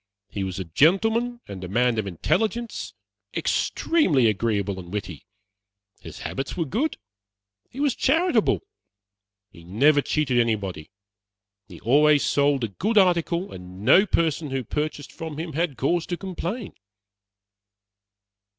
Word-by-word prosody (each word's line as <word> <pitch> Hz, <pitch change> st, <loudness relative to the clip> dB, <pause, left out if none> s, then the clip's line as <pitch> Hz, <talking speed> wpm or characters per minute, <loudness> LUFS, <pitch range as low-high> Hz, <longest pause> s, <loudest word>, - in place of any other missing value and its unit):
He 100 Hz, -, -4 dB
was 95 Hz, -2 st, -4 dB
a 95 Hz, -, -3 dB
gentleman 225 Hz, -, +2 dB
and 95 Hz, -2 st, -8 dB
a -, -, -5 dB
man 120 Hz, +3 st, +1 dB
of 105 Hz, -, -2 dB
intelligence, 220 Hz, -, -2 dB, 0.4 s
extremely 180 Hz, -, +2 dB
agreeable 100 Hz, -2 st, 0 dB
and 90 Hz, -1 st, -10 dB
witty. 95 Hz, -6 st, -6 dB, 0.7 s
His -, -, -10 dB
habits 135 Hz, +5 st, -4 dB
were 165 Hz, -, 0 dB
good; 250 Hz, -, -1 dB, 0.7 s
he 265 Hz, -, -10 dB
was 285 Hz, -3 st, +2 dB
charitable. 325 Hz, +9 st, +2 dB, 0.9 s
He 85 Hz, -, -15 dB
never 140 Hz, -, +3 dB
cheated 135 Hz, -4 st, 0 dB
anybody. 100 Hz, -9 st, -1 dB, 0.8 s
He 90 Hz, -5 st, -12 dB
always 145 Hz, +4 st, +4 dB
sold 140 Hz, -2 st, +2 dB
a 115 Hz, -, -1 dB
good 215 Hz, -, -1 dB
article, 180 Hz, -1 st, +2 dB
and 90 Hz, +1 st, -10 dB
no 190 Hz, -, +6 dB
person 160 Hz, -3 st, 0 dB
who 135 Hz, -1 st, -2 dB
purchased 150 Hz, +3 st, -4 dB
from 160 Hz, -2 st, -7 dB
him 160 Hz, 0 st, -5 dB
had 165 Hz, -2 st, -1 dB
cause 170 Hz, +5 st, 0 dB
to 175 Hz, -, -3 dB
complain." 190 Hz, +4 st, -5 dB
145 Hz, 130 wpm, -24 LUFS, -, 0.9 s, no